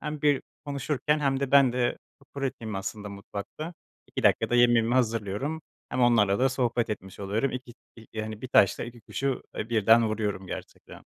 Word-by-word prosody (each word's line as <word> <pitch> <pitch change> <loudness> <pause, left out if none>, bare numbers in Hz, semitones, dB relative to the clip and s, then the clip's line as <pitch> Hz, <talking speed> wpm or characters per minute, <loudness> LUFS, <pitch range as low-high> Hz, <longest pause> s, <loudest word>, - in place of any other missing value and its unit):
Hem 150 -1 -5
bir 145 -2 +3 0.2
konuşurken 145 +1 0
hem 135 -1 +1
de 140 - -1
ben 140 -3 +6
de 125 -1 0 0.4
pratiğim 125 -6 -3
aslında 105 +2 -5
mutfakta, 100 - -7 0.3
2 - - -5
dakikada 120 - +3
yemeğimi 120 -1 +4
hazırlıyorum, 115 +5 0 0.3
hem - - -2
onlarla 110 -5 +4
da 130 +2 +4
sohbet 120 -3 0
etmiş 95 -1 -6
oluyorum. 105 +7 0
İ 130 - -3 0.4
iki, 110 -1 -7
hani, 110 0 -6
bir 130 - -5
taşla 100 -5 +4
iki 120 0 -10
kuşu, 135 +4 -2
eee, 110 - -3
birden 115 0 +5
vuruyorum 105 -3 -2
gerçekten. - - -9
120 Hz, 165 wpm, -27 LUFS, 105-135 Hz, 0.4 s, ben